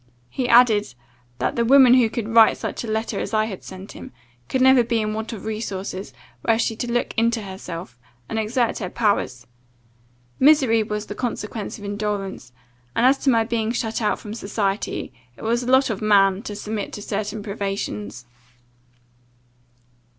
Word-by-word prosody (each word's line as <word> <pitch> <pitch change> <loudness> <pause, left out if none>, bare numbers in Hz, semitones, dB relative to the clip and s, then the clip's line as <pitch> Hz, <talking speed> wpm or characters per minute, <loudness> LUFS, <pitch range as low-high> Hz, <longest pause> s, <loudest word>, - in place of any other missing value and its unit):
He 255 -2 -2
added, 220 - +5 0.4
'That - - -1
the 235 - +3
woman 260 0 +7
who 250 -3 +5
could 220 -1 -4
write 225 -1 +6
such - - -4
a - - -6
letter 220 +1 -2
as - - -3
I 215 0 +3
had 200 -4 -7
sent 190 +1 -10
him, - - -10 0.4
could 260 - 0
never 260 -1 +6
be 230 0 0
in 215 -1 -1
want 220 +1 -4
of 215 -3 -8
resources, 200 -5 -4 0.3
were 225 - +3
she 225 0 0
to 245 0 -3
look 240 0 -1
into 230 0 +1
herself, 175 - -8 0.3
and 220 - -2
exert 230 +2 0
her 185 - -4
powers; 195 - 0 0.9
misery 265 -6 +5
was 210 0 -3
the 205 - -6
consequence 215 -2 -4
of 205 - -10
indolence, 200 - -4 0.4
and, 235 - +3
as 270 +2 +5
to 275 - +1
my 230 -3 +4
being 225 -1 -1
shut 230 -1 -2
out 210 - +1
from 210 - -8
society, 200 -2 -2 0.2
it - - -12
was 235 +2 +1
the - - +1
lot 260 -2 +4
of 205 - -4
man 195 -2 +4
to 210 -3 -6
submit 210 0 -4
to 205 - -6
certain 210 +1 -3
privations. 195 - -4
220 Hz, 175 wpm, -22 LUFS, 200-235 Hz, 0.9 s, woman